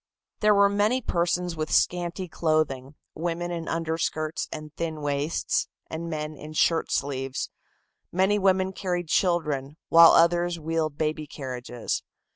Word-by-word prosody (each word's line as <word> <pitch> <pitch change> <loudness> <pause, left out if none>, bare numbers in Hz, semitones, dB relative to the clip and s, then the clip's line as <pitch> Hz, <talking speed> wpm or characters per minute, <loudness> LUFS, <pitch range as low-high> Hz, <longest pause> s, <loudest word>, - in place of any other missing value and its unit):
There 210 0 +4
were 200 0 +6
many 205 +5 +2
persons 175 -4 -1
with 155 -1 -3
scanty 175 +1 +1
clothing, 155 -5 0 0.2
women 175 +1 -3
in 170 -2 -4
underskirts 160 -1 -2
and 155 -1 -7
thin 160 -2 -3
waists 145 +2 0 0.2
and 165 +1 -4
men 155 -1 -4
in 150 +2 -9
shirt 165 +1 +2
sleeves. 135 -1 -2 0.6
Many 190 +3 +2
women 190 -1 +2
carried 175 -3 -3
children, 150 -6 0
while 165 0 +9
others 175 0 +3
wheeled 160 -2 -2
baby 155 -1 -1
carriages. 125 -4 -4
165 Hz, 130 wpm, -26 LUFS, 150-175 Hz, 0.6 s, while